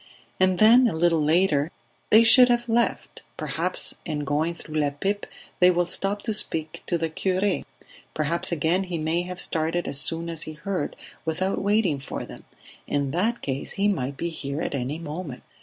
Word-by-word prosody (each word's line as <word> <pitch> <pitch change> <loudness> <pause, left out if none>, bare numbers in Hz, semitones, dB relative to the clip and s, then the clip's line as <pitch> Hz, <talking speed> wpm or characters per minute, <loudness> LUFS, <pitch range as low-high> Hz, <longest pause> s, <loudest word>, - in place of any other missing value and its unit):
And 185 -1 +3
then 235 +5 +7
a 205 - -2
little 165 -1 +2
later: 155 -2 +2 0.4
"They 220 +2 +7
should 250 +2 +7
have 240 0 +1
left; 235 +1 0 0.2
perhaps - - -2
in 150 -3 -3
going 155 +4 0
through 155 -2 -4
La 145 -1 +2
Pipe 195 +9 -3 0.3
they 180 - +7
will 175 0 +2
stop 195 +3 -2
to 220 - -1
speak 160 -6 +1
to 175 - +1
the 165 0 -1
cure; 185 +4 0 0.5
perhaps 155 +4 -1
again 170 +4 +1
he 180 -2 -4
may 160 +2 0
have 180 0 -6
started 165 +2 -1
as 140 0 +1
soon 165 +4 -2
as 165 -2 -4
he 155 - -5
heard, 165 0 -3 0.3
without 175 +4 -1
waiting 200 -7 +2
for 135 - -6
them. - - -12 0.4
In 140 -2 -1
that 215 +9 0
case 135 -1 -2
he 200 +1 +1
might 140 -9 -1
be 170 - -2
here 140 -3 -5
at - - -3
any 140 +2 -2
moment." 155 -5 -7
170 Hz, 185 wpm, -25 LUFS, 150-195 Hz, 0.5 s, then